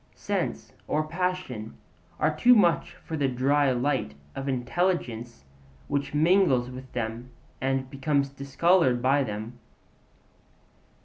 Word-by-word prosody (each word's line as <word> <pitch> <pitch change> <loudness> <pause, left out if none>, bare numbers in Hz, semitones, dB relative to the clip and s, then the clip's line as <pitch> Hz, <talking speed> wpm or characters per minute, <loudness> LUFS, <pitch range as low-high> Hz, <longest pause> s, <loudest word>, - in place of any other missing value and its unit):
Sense - - -3
or 155 +1 0
passion 165 - -3 0.4
are - - +1
too 250 +1 +6
much 180 -6 +2
for 160 - -7
the 145 -3 +1
'dry 135 +2 +2
light' 125 - -1 0.2
of 135 +1 -4
intelligence 125 - -1 0.4
which 140 +1 -2
mingles 150 -6 +3
with 130 0 -10
them 120 +1 -4 0.3
and 135 0 0
becomes 140 +1 0
discoloured 140 0 +2
by 135 +3 +3
them. 110 +1 -6
135 Hz, 115 wpm, -27 LUFS, 125-155 Hz, 0.4 s, too